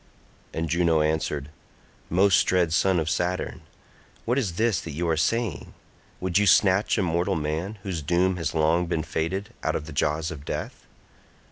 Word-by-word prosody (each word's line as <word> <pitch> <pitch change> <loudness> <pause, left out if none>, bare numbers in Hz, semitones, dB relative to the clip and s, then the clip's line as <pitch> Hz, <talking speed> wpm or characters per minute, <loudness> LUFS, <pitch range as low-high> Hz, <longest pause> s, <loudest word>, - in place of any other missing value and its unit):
And 80 0 -2
Juno 85 -1 +2
answered, 75 -2 -1 0.6
"Most 95 +2 +4
dread 90 -3 +2
son 95 +1 +3
of 80 - -2
Saturn, 90 +2 -2 0.6
what 120 +4 +1
is 100 -10 -2
this 110 +1 +1
that 80 - -7
you 85 +4 -2
are 80 - +2
saying? 110 +2 -1 0.4
Would 95 +1 +1
you 105 - +2
snatch 100 +1 +4
a - - +2
mortal 90 +3 0
man, 80 +7 -3
whose 90 -5 -3
doom 90 +4 +1
has 85 -1 -3
long 80 +3 +2
been 80 -2 -1
fated, 95 +10 -3
out 80 - -1
of 75 - -3
the 80 - -9
jaws 75 +3 0
of 75 -4 -8
death? - - -6
85 Hz, 170 wpm, -25 LUFS, 80-95 Hz, 0.6 s, Most